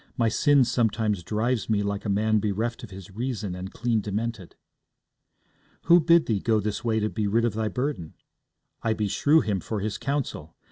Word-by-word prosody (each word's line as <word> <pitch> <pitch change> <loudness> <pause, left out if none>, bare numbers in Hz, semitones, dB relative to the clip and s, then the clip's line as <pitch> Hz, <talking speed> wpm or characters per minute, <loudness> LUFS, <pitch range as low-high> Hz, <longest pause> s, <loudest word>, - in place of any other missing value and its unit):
My 115 -2 +2
sin 145 +3 +4
sometimes 110 -5 0
drives 110 +3 -1
me 105 -2 +2
like 100 0 -3
a - - -1
man 110 +2 +2
bereft 110 +4 -2
of 115 - -8
his 95 0 -11
reason 110 -3 -3
and 90 +1 -6
clean 115 -2 0
demented.' 105 -1 -4 1.3
'Who 175 +1 +6
bid 170 0 +4
thee 110 -4 0
go 110 +2 +1
this 105 0 -3
way 110 -2 +1
to 105 - 0
be 110 -1 -2
rid 115 +3 +2
of 115 - 0
thy 110 0 -1
burden? 125 - -3 0.7
I 115 - +1
beshrew 110 +9 +2
him 105 -4 -1
for 105 +5 -4
his 105 +1 -3
counsel. 135 - -3
110 Hz, 185 wpm, -26 LUFS, 100-120 Hz, 1.3 s, Who